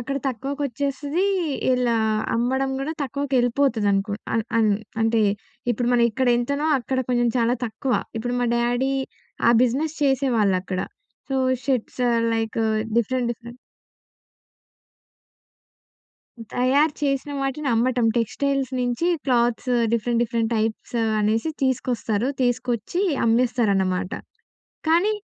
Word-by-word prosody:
అక్కడ 275 +3 -3
తక్కువకొచ్చేస్తదీ, 280 - -2 0.5
ఇలా 250 -2 +1 0.4
అమ్మడం 265 +3 0
గూడా 290 +4 -2
తక్కువకెళ్ళిపోతదనుకున్ 240 -7 +1 0.2
అన్ 225 - +2 0.2
అన్ 220 -2 +4 0.3
అంటే, 225 0 +2 0.5
ఇప్పుడు 240 +2 -2
మనం 240 -1 +4
ఇక్కడ 260 +3 0
ఎంతనో, 280 +5 -1
అక్కడ 260 +1 -3
కొంచెం 240 -1 +2
చాలా 235 0 +2
తక్కువ. 240 +3 -3 0.3
ఇప్పుడు 245 +2 -2
మా 245 - +1
డ్యాడీ 245 +3 +1 0.6
ఆ - - +7
బిజినెస్ 285 +6 0
చేసేవాళ్ళక్కడ. 215 -9 +1 0.5
సో, 270 - -1 0.3
షర్ట్స్ 255 -1 -1
ఆహ్, 235 - +2
లైక్ 225 0 -2 0.4
డిఫరెంట్ 245 +1 0
డిఫరెంట్ 235 +2 -12 2.8
హ్మ్. 230 - -9
తయారు 275 +5 +3
చేసిన 280 0 -1
వాటిని 275 +2 -2
అమ్మటం. 245 0 +2
టెక్స్‌టైల్స్ 275 +3 -1
నించి 245 +7 0 0.2
క్లాత్స్, 240 0 +1 0.2
డిఫరెంట్ 235 +1 +1
డిఫరెంట్ 230 -1 -1
టైప్స్ 220 +2 -2 0.2
అనేసి 220 +7 +1
తీసుకొస్తారు. 245 -3 0
తీసుకొచ్చి, 245 - 0 0.2
అమ్మేస్తారనమాట, 220 -6 +1 0.8
కానీ 355 +7 +3
245 Hz, 105 wpm, -23 LUFS, 230-270 Hz, 2.8 s, ఆ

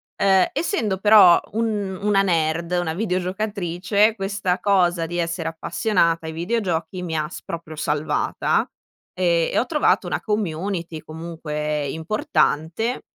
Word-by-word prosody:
Ehm, 190 -1 +4
essendo 220 - -1
però 200 -5 +7
un 210 -4 -2
una 205 -1 +3
nerd, 170 -2 0
una 175 -3 0
videogiocatrice, 195 +1 0
questa 195 -2 -1
cosa 180 -4 +2
di 175 +1 -5
essere 165 -1 -2
appassionata 165 -1 0
ai - - -4
videogiochi 175 -1 -2
mi 165 -2 -3
ha 150 0 -1
s 170 - -10
proprio 165 -2 -7
salvata 150 0 0 0.5
e 170 -2 +1
e - - +3
ho 250 - +1
trovato 300 -2 +1
una - - -2
community 180 -5 -3
comunque 150 -2 -4
importante, 175 - -1
180 Hz, 130 wpm, -22 LUFS, 165-200 Hz, 0.5 s, però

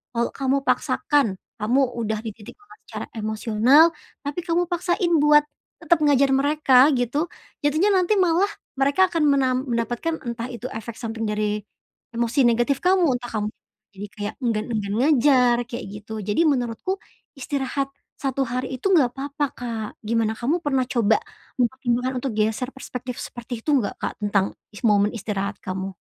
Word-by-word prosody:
kalau 235 0 +1
kamu 270 0 +1
paksakan, 275 -7 +1 0.2
kamu 235 +6 +2
udah 220 -2 -2
dititik 220 -2 -9
lelah 415 - -18
secara - - -6
emosional, 225 +8 +4 0.3
tapi 285 +3 -3
kamu 340 +1 +2
paksain 350 0 0
buat 295 0 +6 0.4
tetap 340 -2 +3
ngajar 280 -2 +4
mereka, 275 -1 +5
gitu. 250 +7 0 0.4
Jatuhnya 310 +8 +3
nanti 370 +3 +3
malah 365 +2 +3 0.3
mereka 285 +8 +3
akan 330 -2 +1
menam 270 -3 +3
mendapatkan 240 +7 -2
entah 235 -1 -4
itu 240 +1 -6
efek 225 +1 -6
samping 225 -1 -3
dari 210 0 -1 0.6
emosi 235 +4 +2
negatif 240 +4 +2
kamu, 365 -4 +4
entah 245 - -8
kamu 210 -1 -1 0.4
jadi 200 +1 -7
kayak 205 -1 -4
enggan-enggan 215 -3 -1
ngajar, 255 -4 +4
kayak 240 -1 -6 0.2
gitu. 220 +1 -6
Jadi, 210 - +1
menurutku 250 - 0 0.4
istirahat 275 0 -2 0.3
1 270 -1 0
hari 255 +2 -3
itu 390 +10 0
enggak 275 -9 +4
apa-apa, 285 +2 -2
Kak. 230 -3 -4 0.2
Gimana, 225 0 +1
kamu 290 +9 0
pernah 270 -5 +1
coba 225 -4 +3 0.4
mempertimbangkan 250 0 0
untuk 270 - -2
geser 220 +4 0
perspektif 250 -1 -6
seperti 240 -1 -7
itu 305 - 0
enggak, 245 -7 0
Kak, - - -2
tentang 200 -2 +1 0.2
is - - -10
momen 205 -1 +4
istirahat 200 -1 -3
kamu? 190 0 -4
250 Hz, 150 wpm, -23 LUFS, 225-285 Hz, 0.6 s, buat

